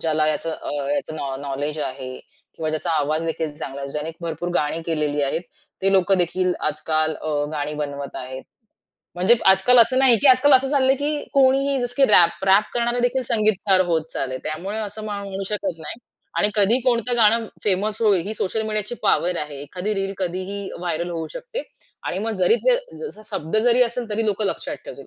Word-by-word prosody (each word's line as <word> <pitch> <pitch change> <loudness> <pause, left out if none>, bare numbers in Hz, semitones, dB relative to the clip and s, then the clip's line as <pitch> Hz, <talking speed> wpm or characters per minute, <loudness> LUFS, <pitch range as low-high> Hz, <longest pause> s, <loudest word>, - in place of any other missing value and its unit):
ज्याला 155 -1 +1
याच 155 - -2
अ, 160 - -5 0.2
याचं 155 - -3
नॉ 135 -2 -4
नॉलेज 145 +2 -3
आहे 130 -1 -5 0.5
किंवा 160 -1 -2
ज्याचा 155 +2 -2
आवाजदेखील 155 0 -1
चांगला 140 -1 -7
आहे, 140 - -5
ज्याने 150 +3 -4
भरपूर 170 0 -4
गाणी 155 0 0
केलेली 150 -3 -1
आहेत. 140 +5 -1 0.4
ते 195 0 +2
लोकंदेखील 185 -1 +2 0.2
आजकाल 155 +1 -1
अ, 150 -2 -1
गाणी 150 0 -3
बनवत 140 -1 -5
आहेत. 130 +1 -7 0.7
म्हणजे 185 +6 +4
आजकाल 195 +6 +5
असं 255 +3 +5
नाही 260 -3 +7
की - - +5
आजकाल 260 +3 +6
असं 265 0 +5
चाललंय 270 -2 +3
की 295 +1 -1 0.2
कोणीही 275 0 +3
जसं 245 0 -3
की 275 - +5
रॅप 175 +1 +5
रॅप 195 +2 +5
करणारेदेखील 245 +2 0
संगीतकार 215 -4 +2
होत 165 -2 +1
चालले. 130 -1 -3
त्यामुळे 185 +8 -4
असं 215 0 -6
म्हणू 200 -2 -5
शकत 200 -5 -2
नाही 160 +7 -7 0.4
आणि 205 - +4
कधी 210 +4 +4
कोणतं 245 -1 +1
गाणं 225 0 +4 0.2
फेमस 210 +2 +1
होईल 195 -5 +3
ही 210 - -2
सोशल 220 +1 -1
मीडियाची 215 +1 -1
पॉवर 180 -3 +2
आहे. 150 -2 -5
एखादी 185 +8 -4
रील 195 -1 -2
कधीही 185 +2 -3
व्हायरल 175 0 -3
होऊ 165 -2 -4
शकते - - -5 0.4
आणि - - -2
मग 225 +2 -2
जरी 180 +6 +5
जे - - +6 0.3
जसा 215 - -11
शब्द 160 +6 -2
जरी 245 +1 +5
असेल, 235 -1 -1
तरी 220 +1 -1
लोकं 210 0 0
लक्षात - - -3
ठेवतील - - -10
190 Hz, 180 wpm, -22 LUFS, 155-225 Hz, 0.7 s, नाही